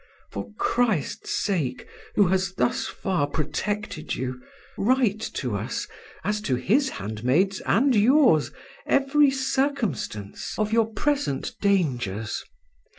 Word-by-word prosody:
For - - -6
Christ's 230 - 0
sake, 150 -11 -1 0.3
who 200 -4 +4
has 190 0 0
thus 125 - 0
far 180 -7 -1
protected 160 +4 -3
you, 125 0 -4 0.3
write 230 -2 +2 0.2
to 125 -7 -2
us, 100 - -3 0.4
as 210 +1 -1
to 135 -11 0
His 230 - +2
handmaids 130 - 0
and 260 +5 +4
yours, 220 - +5 0.4
every 280 +1 +4
circumstance 265 - -2
of 215 0 0
your 225 -1 +3
present 285 - -1
dangers. 125 - 0
195 Hz, 110 wpm, -25 LUFS, -, 0.4 s, yours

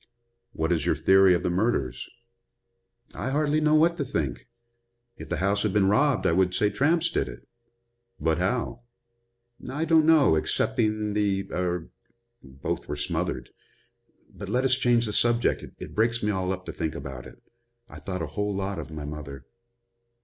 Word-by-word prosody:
"What 80 +2 -1
is 80 -4 +1
your - - +1
theory 95 -1 +5
of 85 - -2
the 90 - 0
murders?" 85 - -1 1.0
"I - - -3
hardly 150 +2 +1
know 155 0 +4
what 170 +2 +4
to 145 - -1
think. 70 - -3 0.7
If - - -10
the - - -1
house 100 +2 +1
had 105 -2 0
been 100 -2 +3
robbed 140 +4 +2
I - - +4
would 90 +1 +2
say 105 +1 +2
tramps 165 +4 +2
did - - 0
it." - - -12 0.7
"But 80 0 +1
how?" 115 +5 -1 0.9
"I 150 +5 -2
don't 160 -1 +4
know, 155 - +6
excepting 105 +6 0
the 100 -2 0
er 90 -2 -2 0.5
both 65 0 -5
were 75 - -3
smothered. 75 - -3 0.8
But - - -9
let 130 +2 +1
us 130 - +3
change 120 -3 +3
the 105 - -3
subject. 120 +1 +1 0.2
It - - -8
breaks 115 +1 +1
me 105 - +1
all 95 -2 -1
up 95 -1 -5
to - - -5
think 80 - -3
about 65 -2 -7
it. - - -15 0.5
I - - -11
thought 90 -3 -4
a 75 -1 -7
whole 105 -1 -1
lot 100 0 -3
of - - -7
my 75 -2 -7
mother." 70 -3 -8
100 Hz, 175 wpm, -26 LUFS, 85-120 Hz, 1.0 s, know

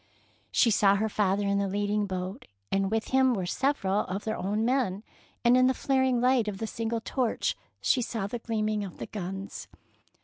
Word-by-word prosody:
She 230 - +4
saw 200 -1 +4
her 215 +2 0
father 200 -1 +1
in 200 0 +1
the 200 - 0
leading 205 +1 0
boat, 185 +4 -5 0.2
and 195 0 +1
with 220 +1 -1
him 260 -1 +4
were 190 -3 -2
several 205 -2 0
of 195 +3 -4
their 220 0 -2
own 210 +3 -1
men, 235 -6 0 0.4
and 240 +1 +6
in 255 0 +5
the 260 - +2
flaring 260 -2 +2
light 250 -2 +3
of 205 -2 -3
the 225 - -3
single 225 +1 -3
torch 245 -1 -1 0.3
she 255 - +2
saw 225 -3 -3
the 235 +4 -4
gleam 220 -2 -1
ing 210 -1 -1
of 190 -4 -8
the - - -5
guns. 195 -1 -6
215 Hz, 200 wpm, -28 LUFS, 195-240 Hz, 0.4 s, and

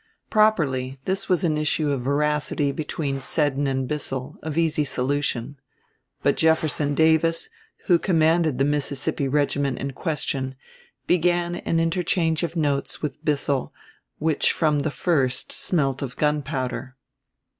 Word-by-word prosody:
Properly 140 - +2
this 195 +1 -2
was 180 -1 +2
an 155 -3 +1
issue 150 0 +1
of 135 -3 -1
veracity 145 +1 0
between 140 -2 -3
Seddon 145 0 0
and 135 -1 -1
Bissell, 135 -1 -3
of 155 -1 -5
easy 160 -2 +2
solution. 140 -1 -2 0.6
But 140 - +2
Jefferson 155 -2 +2
Davis, 160 - +2 0.3
who 175 -2 +4
commanded 160 -4 +2
the 135 - +2
Mississippi 145 -1 -1
regiment 140 -1 0
in 140 +1 -3
question, 135 -2 -2 0.5
began 175 0 +1
an 165 - 0
interchange 165 -1 +1
of 170 -1 -3
notes 145 -3 -1
with 150 +1 -4
Bissell 145 -3 0 0.5
which 155 -1 +2
from 150 -3 +2
the 155 - 0
first 135 -3 0
smelt 135 -6 0
of 130 -3 -5
gunpowder. 135 -4 -1
150 Hz, 130 wpm, -24 LUFS, 135-160 Hz, 0.6 s, who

